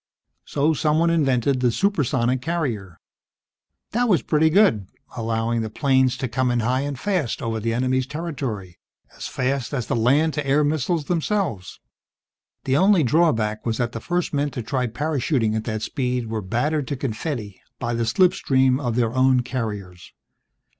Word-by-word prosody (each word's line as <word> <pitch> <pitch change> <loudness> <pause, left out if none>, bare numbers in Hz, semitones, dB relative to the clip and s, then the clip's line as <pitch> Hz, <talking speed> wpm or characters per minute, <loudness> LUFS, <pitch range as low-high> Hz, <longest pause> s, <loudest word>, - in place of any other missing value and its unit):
So 150 +3 +1
someone 155 +2 +2
invented 135 -4 +2
the 125 -1 +2
supersonic 130 - +1
carrier. 125 - -3 0.9
This 245 +2 +1
was 180 - +3
pretty 160 0 +3
good, 155 - +3 0.3
allowing 115 0 -1
the 110 - -3
planes 130 +1 +2
to 130 - -2
come 125 +2 0
in 120 -1 +1
high 125 +3 +1
and 140 -2 -4
fast 180 - -1
over 115 -1 -2
the 115 +2 -1
enemy's 130 +1 0
territory, 135 - -5 0.4
as - - -6
fast 135 +1 -2
as 125 -4 -2
the - - -1
land 140 +7 +3
to 150 -2 -3
air 145 +2 +3
missiles 155 +2 0
themselves. 165 - -2 0.8
The 130 - +1
only 190 -1 +4
drawback 115 -7 +1
was 115 -2 -1
that 120 -1 -1
the 115 - -5
first 175 +3 -2
men 145 0 +1
to 120 - -2
try 125 +2 -1
parachuting 130 -3 0
at 110 - -2
that 110 -1 -3
speed 125 -4 -2
were 110 -1 -2
battered 130 +8 -1
to 145 - -2
confetti 115 - -4 0.2
by 120 0 -3
the 115 0 0
slipstream 130 -2 +3
of 120 -2 -1
their 115 -2 +1
own 130 0 +4
carriers. 105 -8 -5
130 Hz, 165 wpm, -23 LUFS, 115-150 Hz, 0.9 s, only